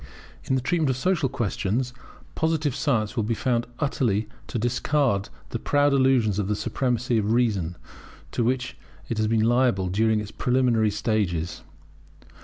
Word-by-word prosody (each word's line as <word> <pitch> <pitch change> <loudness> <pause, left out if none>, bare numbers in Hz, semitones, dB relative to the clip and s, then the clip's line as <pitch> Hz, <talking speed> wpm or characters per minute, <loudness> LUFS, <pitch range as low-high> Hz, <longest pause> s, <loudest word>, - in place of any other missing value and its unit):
In 130 - +1
the 130 - 0
treatment 160 +2 +1
of 130 - 0
social 170 -2 +1
questions 120 0 -1 0.4
Positive 160 -3 0
science 125 -6 0
will 115 - +1
be 115 +2 -1
found 120 +1 0
utterly 120 -8 0 0.2
to - - -3
discard 120 -2 +1 0.2
those - - -3
proud 145 0 +3
illusions 130 -7 +3
of 100 - -1
the 105 - 0
supremacy 120 0 0
of 105 +1 0
reason, 100 -8 +1 0.5
to 120 - 0
which 125 +1 -1 0.3
it 115 - -2
had 110 0 +1
been 110 -1 +2
liable 120 -6 +2
during 110 +3 +2
its 105 -1 -6
preliminary 125 -4 +2
stages. 100 -6 -1
120 Hz, 155 wpm, -25 LUFS, 105-130 Hz, 0.5 s, proud